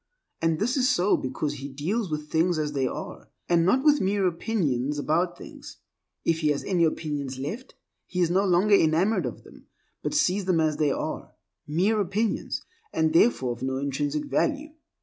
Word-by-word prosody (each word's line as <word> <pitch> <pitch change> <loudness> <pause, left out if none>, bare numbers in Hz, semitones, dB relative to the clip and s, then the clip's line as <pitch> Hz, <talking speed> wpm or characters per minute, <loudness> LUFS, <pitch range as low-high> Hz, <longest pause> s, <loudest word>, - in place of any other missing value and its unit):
And 165 -1 +2
this 240 - 0
is 255 -1 +3
so 185 +4 +3
because 145 +3 -3
he 140 +1 -6
deals 175 - -2
with 150 -1 -4
things 165 +1 +2
as 150 -1 -1
they 135 -2 0
are, - - -7 0.2
and 170 -1 +3
not 250 +10 +3
with 295 -1 +4
mere 195 +1 +1
opinions 155 - -1
about 170 +5 0
things, - - -11 0.5
If 165 -1 +2
he 155 - 0
has 145 -1 0
any 175 -3 +2
opinions 145 -4 -3
left, 210 - -6 0.3
he 180 - -4
is 175 -1 +2
no 190 +2 +3
longer 195 +2 +3
enamored 180 +4 +3
of - - -8
them, - - -17 0.3
but - - -3
sees 200 -9 +2
them 180 -3 +2
as 155 -2 +1
they 150 -2 +2
are—mere 185 +10 -3
opinions, 205 +4 -1 0.3
and 160 0 +1
therefore 150 - +3
of 120 - -13
no 130 0 -1
intrinsic 140 - -2
value. 300 +1 -1
170 Hz, 180 wpm, -26 LUFS, 150-200 Hz, 0.5 s, with